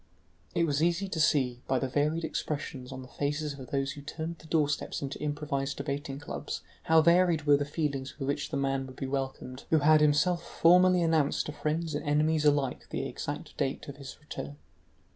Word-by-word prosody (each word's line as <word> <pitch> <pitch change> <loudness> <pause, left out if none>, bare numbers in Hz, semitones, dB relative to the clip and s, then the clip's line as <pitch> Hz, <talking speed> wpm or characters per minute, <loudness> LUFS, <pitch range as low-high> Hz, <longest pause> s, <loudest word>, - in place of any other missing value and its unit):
It 170 - +3
was 150 -2 +1
easy 175 +4 +2
to 170 - -4
see, 130 -6 +2
by 130 - +2
the 130 - 0
varied 150 +5 0
expressions 140 -4 -4
on 130 0 -7
the - - -11
faces 145 +2 -2
of 130 -3 -10
those 135 -1 0
who 145 0 -8
turned 160 +3 -5
the 160 - -14
doorsteps 150 -3 0
into 135 0 -5
improvised 145 -2 -2
debating 140 -1 -3
clubs, 145 - -5 0.2
how 160 0 +5
varied 170 -2 +4
were 145 -1 +5
the 145 - -1
feelings 140 -3 -3
with 135 -3 -4
which 145 +1 -1
the 150 - -2
man 135 -1 0
would 130 - -11
be 135 - -4
welcomed 135 -1 -4
who 160 - +5
had 155 +1 +5
himself 150 +4 +3
formally 180 +1 +5
announced 160 -3 +2
to - - -4
friends 155 +2 -2
and 145 - -2
enemies 150 +1 +2
alike 145 -3 +1
the - - -2
exact - - -6
date 135 - -2
of 140 - -8
his 140 -2 -9
return. 145 -1 -7
145 Hz, 200 wpm, -29 LUFS, 140-160 Hz, 0.2 s, how